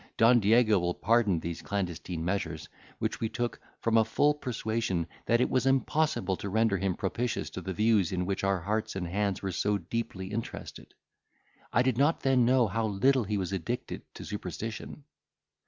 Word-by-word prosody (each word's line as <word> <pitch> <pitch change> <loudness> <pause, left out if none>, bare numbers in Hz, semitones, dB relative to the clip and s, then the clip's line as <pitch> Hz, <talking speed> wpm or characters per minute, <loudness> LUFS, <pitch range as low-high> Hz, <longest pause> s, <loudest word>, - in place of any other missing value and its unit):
Don 120 +2 +6
Diego 110 0 +4
will 90 0 -1
pardon 110 -5 +2
these 85 +1 -5
clandestine 90 -4 -3
measures, 85 -5 -2 0.3
which - - -2
we 110 - -1
took, 120 0 -3 0.2
from 115 0 +2
a - - +5
full 145 +7 +2
persuasion 115 - -2 0.2
that 120 0 +4
it 125 - +3
was 130 0 +1
impossible 135 - +1
to 100 - -5
render 110 0 +2
him 95 -2 0
propitious 115 +6 -2
to - - -6
the 95 - -4
views 105 -2 +2
in 90 -1 -1
which 100 +1 -2
our 95 -2 +1
hearts 105 +4 -2
and 90 -2 -3
hands 100 +2 -1
were 95 - -1
so 105 +3 +1
deeply 95 0 -4
interested. 115 +1 -6 0.8
I - - +3
did 130 -2 +1
not 145 +4 +3
then 130 -3 +3
know 125 0 +4
how 110 +2 -1
little 120 +5 +2
he 105 +1 -1
was 95 0 -2
addicted 95 +7 -3
to - - -8
superstition. 105 - -6
105 Hz, 180 wpm, -29 LUFS, 95-120 Hz, 0.8 s, Don